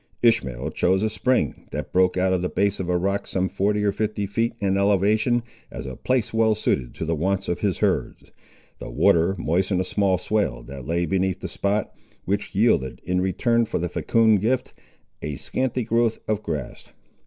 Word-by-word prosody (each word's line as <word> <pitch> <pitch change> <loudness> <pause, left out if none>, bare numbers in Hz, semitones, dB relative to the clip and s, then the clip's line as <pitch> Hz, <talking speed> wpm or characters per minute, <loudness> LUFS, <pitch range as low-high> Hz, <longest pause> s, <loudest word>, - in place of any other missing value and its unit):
Ishmael 65 - +2
chose 95 +5 +1
a 110 - 0
spring, 110 - 0
that 75 0 -5
broke 90 0 +3
out 95 0 +2
of 90 - +1
the 90 - -1
base 100 0 0
of 90 -2 -3
a 90 - +2
rock 100 +3 -1
some 95 0 0
forty 105 +2 0
or 100 - +3
fifty 105 0 -2
feet 115 +4 -1
in 95 -2 +1
elevation, 105 +4 +2 0.3
as - - -7
a 65 -1 -6
place 125 - -1
well 110 -1 +3
suited 65 - -1
to - - -4
the 85 - 0
wants 95 +5 -1
of 85 - -1
his 100 -4 0
herds. - - -1 0.5
The - - -7
water 85 +3 +3
moistened 90 +3 0
a - - +1
small 95 0 +1
swale 105 - -1
that 65 0 -9
lay 85 +1 0
beneath 95 +2 0
the - - -4
spot, 100 +2 -1 0.3
which 100 +1 -2
yielded, 95 - +2
in 90 0 0
return 115 +5 +1
for - - -2
the 90 +1 -2
fecund 110 -3 +3
gift, 120 +4 0 0.5
a 75 -1 -4
scanty 130 - -2
growth 115 0 +1
of 110 -1 0
grass. 75 - -5
95 Hz, 190 wpm, -24 LUFS, 90-110 Hz, 0.5 s, broke